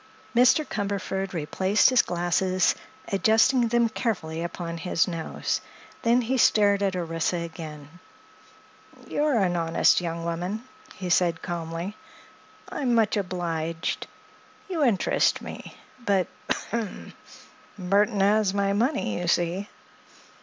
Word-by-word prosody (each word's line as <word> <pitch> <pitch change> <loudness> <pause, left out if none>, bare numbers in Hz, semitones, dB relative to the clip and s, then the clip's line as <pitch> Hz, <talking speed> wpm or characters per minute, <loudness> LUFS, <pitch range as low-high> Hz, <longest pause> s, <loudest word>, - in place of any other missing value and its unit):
Mr. 255 +5 +5
Cumberford 195 -2 -3
replaced 190 - +2
his 255 - +6
glasses, 175 +1 +1 0.4
adjusting 225 +5 +3
them 235 0 +3
carefully 185 -8 -3
upon 170 0 -5
his 165 0 +1
nose. 165 -3 -3 0.4
Then 235 +1 +3
he 255 +3 0
stared 205 -3 +4
at 195 -2 0
Orissa 165 0 -1
again. 160 -3 -6 1.2
"You're 295 -4 +1
an 185 -4 +2
honest 165 +1 +3
young 170 -1 -4
woman," 180 +6 -3 0.3
he 180 -1 -4
said 170 -2 +2
calmly. 170 +3 -4 0.7
"I'm 250 -4 0
much 225 -2 +3
obliged. 170 -4 -2 0.6
You 345 -6 -1
interest 225 -8 +2
me. - - -9 0.3
But—ahem!—Burthon 200 0 -2
has 200 0 +3
my 200 0 +1
money, 225 - 0
you 175 - -3
see." 175 +4 0
190 Hz, 110 wpm, -26 LUFS, 170-220 Hz, 1.2 s, his